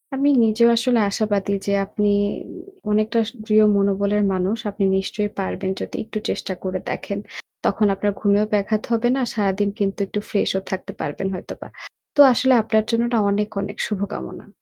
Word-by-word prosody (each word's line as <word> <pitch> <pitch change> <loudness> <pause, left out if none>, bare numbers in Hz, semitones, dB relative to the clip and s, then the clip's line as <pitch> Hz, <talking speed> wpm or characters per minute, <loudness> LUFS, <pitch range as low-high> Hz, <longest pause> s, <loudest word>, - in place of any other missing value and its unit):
আমি 280 +2 +2
নিজেও 225 +1 +4
আসলে 240 0 +2
আশাবাদী 200 -1 -1
যে 200 - 0
আপনি 210 +1 -1 0.8
অনেকটা 215 +2 +2 0.3
দৃঢ় 215 -1 +5
মনোবলের 200 +1 +1
মানুষ। 190 +4 0
আপনি 200 -1 -1
নিশ্চয়ই 205 +2 -2
পারবেন 190 0 -2
যদি - - -6
একটু 215 - -6
চেষ্টা 190 - -3
করে 185 0 -2
দেখেন। 200 0 -4 0.5
তখন 210 +1 +2
আপনার 205 +1 0
ঘুমেও 205 0 +3
ব্যাঘাত 210 +1 +1
হবে 230 +1 +2
না। 270 - 0
আর 240 - -2
সারাদিন 205 -1 +1
কিন্তু 200 0 -1
একটু 210 - -3
freshও 190 -2 0
থাকতে 190 -1 -4
পারবেন 155 +6 -3
হয়তোবা। - - -8 0.5
তো - - -4
আসলে 260 +2 +3
আপনার 220 -1 +2
জন্য 230 0 +2
এটা 235 -2 +2
অনেক, 205 +1 0
অনেক, 200 +1 -6
শুভকামনা। 195 - -5
205 Hz, 165 wpm, -21 LUFS, 195-220 Hz, 0.8 s, দৃঢ়